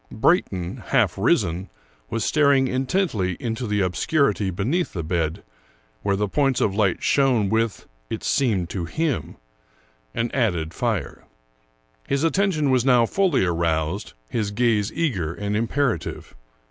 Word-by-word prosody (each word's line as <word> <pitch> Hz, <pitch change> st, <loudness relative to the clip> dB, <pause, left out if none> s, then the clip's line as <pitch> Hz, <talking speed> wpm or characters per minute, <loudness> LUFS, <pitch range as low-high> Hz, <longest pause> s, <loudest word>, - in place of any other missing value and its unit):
Brayton, 100 Hz, -, +1 dB
half 115 Hz, -10 st, +2 dB
risen, 95 Hz, -, +1 dB, 0.4 s
was 115 Hz, -1 st, -2 dB
staring 140 Hz, -3 st, +3 dB
in 130 Hz, +1 st, -1 dB
tently 110 Hz, -, 0 dB
into 120 Hz, +1 st, -3 dB
the 105 Hz, -1 st, 0 dB
obscurity 105 Hz, -, +1 dB
beneath 130 Hz, -, -1 dB
the 85 Hz, -, -3 dB
bed, 80 Hz, -1 st, -2 dB, 0.6 s
where 100 Hz, -, +1 dB
the 105 Hz, +1 st, 0 dB
points 135 Hz, +4 st, +1 dB
of 100 Hz, -, +1 dB
light 100 Hz, -3 st, +1 dB
shone 125 Hz, -8 st, +3 dB
with, 110 Hz, 0 st, 0 dB, 0.2 s
it -, -, -4 dB
seemed 110 Hz, -11 st, +1 dB
to 90 Hz, -4 st, -3 dB
him, 155 Hz, -, -2 dB, 0.8 s
an 115 Hz, 0 st, -1 dB
added 90 Hz, -11 st, 0 dB
fire. -, -, -3 dB, 0.8 s
His 140 Hz, +2 st, 0 dB
attention 165 Hz, -4 st, +2 dB
was 130 Hz, -2 st, +3 dB
now 125 Hz, -3 st, +5 dB
fully 175 Hz, -, +2 dB
aroused, 85 Hz, +2 st, -1 dB
his 105 Hz, -, -2 dB
gaze 105 Hz, -2 st, +1 dB
eager 95 Hz, -, -1 dB
and 105 Hz, 0 st, -3 dB
im 115 Hz, +2 st, 0 dB
perative. 125 Hz, -, -2 dB
110 Hz, 140 wpm, -23 LUFS, 95-135 Hz, 0.8 s, now